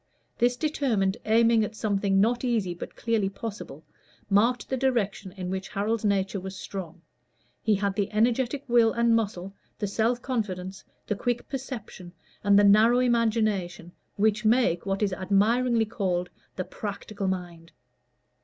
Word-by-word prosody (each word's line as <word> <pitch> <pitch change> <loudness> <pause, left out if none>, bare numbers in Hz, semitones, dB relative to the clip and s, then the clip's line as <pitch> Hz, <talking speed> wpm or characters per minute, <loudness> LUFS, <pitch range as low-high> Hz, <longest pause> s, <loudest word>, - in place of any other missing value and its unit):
This 245 +1 +3
determined 245 -9 0
aiming 230 0 +4
at 210 +1 -4
something 200 -3 +1
not 235 +5 +2
easy 225 -8 0
but 175 - -9
clearly 225 -4 0
possible, 195 -7 -8 0.5
marked 230 +5 +3
the 265 - -1
direction 220 -7 -1
in 185 -2 -5
which 190 0 -4
Harold's 215 +3 -1
nature 200 -1 0
was 190 +1 -7
strong; 180 -3 -7 0.6
he 215 -1 +2
had 200 0 -1
the 200 -1 -2
energetic 240 +5 +1
will 235 -2 +4
and 235 0 +3
muscle, 195 -4 -2 0.2
the 210 - -2
self 225 +4 0
confidence, 190 -7 -4 0.2
the 210 - -1
quick 240 +3 -2
perception, 235 -9 -7 0.3
and 200 0 +5
the 205 - +6
narrow 215 +4 +6
imagination 215 -8 0 0.2
which 215 +1 +1
make 215 -6 +2
what 195 +2 0
is 195 -2 0
admiringly 225 +5 +2
called 185 -5 -2 0.2
the 185 - -2
practical 200 +1 -5
mind. 175 -3 -5
210 Hz, 145 wpm, -26 LUFS, 190-235 Hz, 0.6 s, the